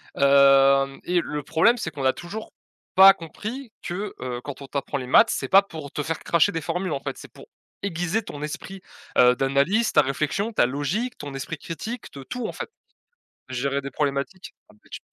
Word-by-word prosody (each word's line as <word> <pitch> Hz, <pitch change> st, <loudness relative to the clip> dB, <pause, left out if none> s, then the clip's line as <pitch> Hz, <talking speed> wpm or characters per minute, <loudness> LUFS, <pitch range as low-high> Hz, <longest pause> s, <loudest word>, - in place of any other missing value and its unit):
hem 135 Hz, 0 st, +5 dB
et 175 Hz, -1 st, +1 dB
le 150 Hz, -3 st, -5 dB
problème, 165 Hz, -, +3 dB
c'est 160 Hz, -, -4 dB
qu'on 145 Hz, -3 st, -6 dB
a 130 Hz, -, +4 dB
toujours 200 Hz, +5 st, -8 dB, 0.5 s
pas 195 Hz, +1 st, +10 dB
compris 215 Hz, -, -8 dB
que, 195 Hz, +3 st, -4 dB
heu, 125 Hz, -1 st, -4 dB
quand 145 Hz, -1 st, -8 dB
on -, -, -10 dB
t'apprend 140 Hz, +1 st, -3 dB
les 130 Hz, -2 st, -6 dB
maths 210 Hz, -, +6 dB
c'est -, -, -2 dB
pas 195 Hz, +1 st, +7 dB
pour 160 Hz, -7 st, -9 dB
te -, -, -3 dB
faire 160 Hz, +2 st, -2 dB
cracher 170 Hz, +4 st, +2 dB
des 165 Hz, -, -2 dB
formules, 180 Hz, +4 st, -3 dB
en 140 Hz, -, -1 dB
fait, -, -, -6 dB
c'est -, -, -12 dB
pour -, -, -14 dB, 0.4 s
aiguiser 180 Hz, +3 st, -1 dB
ton 145 Hz, -7 st, -8 dB
esprit, 175 Hz, +5 st, -6 dB, 0.4 s
heu, 125 Hz, 0 st, +6 dB
d'analyse, 140 Hz, -, +1 dB
ta 150 Hz, -, +6 dB
réflexion, 150 Hz, -, -2 dB
ta 205 Hz, -, +4 dB
logique, 145 Hz, -, -2 dB
ton 145 Hz, -1 st, -7 dB
esprit 140 Hz, +4 st, -5 dB
critique 215 Hz, -, -7 dB
de 140 Hz, -, -9 dB
tout, 245 Hz, -, -4 dB
en -, -, -4 dB
fait. -, -, -7 dB, 0.8 s
Gérer 135 Hz, +2 st, -1 dB
des 140 Hz, 0 st, -7 dB
problématiques? 145 Hz, +6 st, -3 dB, 0.2 s
Ah -, -, -19 dB
bah 105 Hz, -, -26 dB
tu -, -, -6 dB
150 Hz, 200 wpm, -24 LUFS, 140-195 Hz, 0.8 s, pas